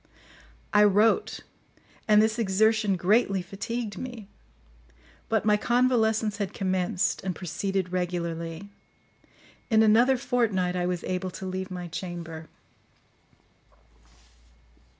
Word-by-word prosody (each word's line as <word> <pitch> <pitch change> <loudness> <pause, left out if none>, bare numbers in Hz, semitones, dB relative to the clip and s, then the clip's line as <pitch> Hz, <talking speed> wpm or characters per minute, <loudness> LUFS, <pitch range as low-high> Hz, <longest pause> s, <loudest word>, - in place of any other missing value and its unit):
I 210 - +6
wrote, 210 - +3 0.7
and 210 0 +6
this 220 +1 0
exertion 215 0 +2
greatly 195 +1 +2
fatigued 205 +2 -5
me; 240 -5 -7 1.0
but 220 -1 +1
my 210 -1 +4
convalescence 225 -3 +1
had 200 -2 -4
commenced, 185 -1 -1
and 185 -2 -3
proceeded 190 +1 -3
regularly. 170 0 -3 1.0
In 220 -2 +5
another 235 +5 +4
fortnight 230 -9 0
I 180 0 -1
was 180 -1 -3
able 185 0 -3
to 190 - -8
leave 185 0 -4
my 180 -1 -6
chamber. 165 -2 -7
195 Hz, 105 wpm, -26 LUFS, 180-220 Hz, 1.0 s, I